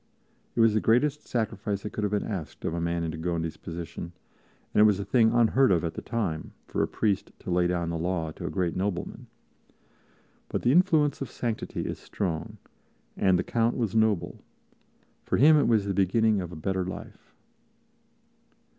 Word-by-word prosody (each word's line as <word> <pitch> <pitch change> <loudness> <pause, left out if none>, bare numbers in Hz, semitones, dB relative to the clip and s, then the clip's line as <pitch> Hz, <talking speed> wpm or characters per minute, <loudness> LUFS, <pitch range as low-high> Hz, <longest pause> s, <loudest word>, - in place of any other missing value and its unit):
It - - +3
was 115 -1 +5
the 110 - +3
greatest 145 +6 +2
sacrifice 105 -4 -2
that 105 - -5
could 105 - -3
have 105 - +1
been 105 0 -1
asked 95 -8 -6
of - - -1
a 85 - -2
man 85 0 -1
in 80 - -2
de 80 - -6
Gondi's 85 -1 -2
position, 85 0 -7 0.6
and - - +5
it - - +8
was 105 -2 +4
a 100 - -3
thing 115 -3 +4
unheard 120 +1 +4
of 85 -2 +2
at 85 - -2
the - - -6
time 95 -10 -3
for - - -2
a - - +2
priest 105 -4 -1
to - - -6
lay 90 0 +3
down 85 -1 -1
the 85 - -3
law 85 -2 -1
to - - -6
a - - -2
great 90 -3 -1
nobleman. 95 -1 -3 1.2
But - - -2
the 120 - +4
influence 155 -4 +3
of 135 - -3
sanctity 115 -3 -3
is - - -4
strong, 85 -6 -4 0.6
and 95 -2 +3
the - - 0
Count 115 0 0
was 115 -5 -1
noble; 110 -4 +1 0.8
for - - 0
him 155 +5 +7
it 150 - +3
was 110 -4 +3
the 100 - -1
beginning 100 +2 +2
of 90 -1 -6
a - - -8
better 95 +4 -1
life. 95 - -9
100 Hz, 195 wpm, -27 LUFS, 85-115 Hz, 1.2 s, it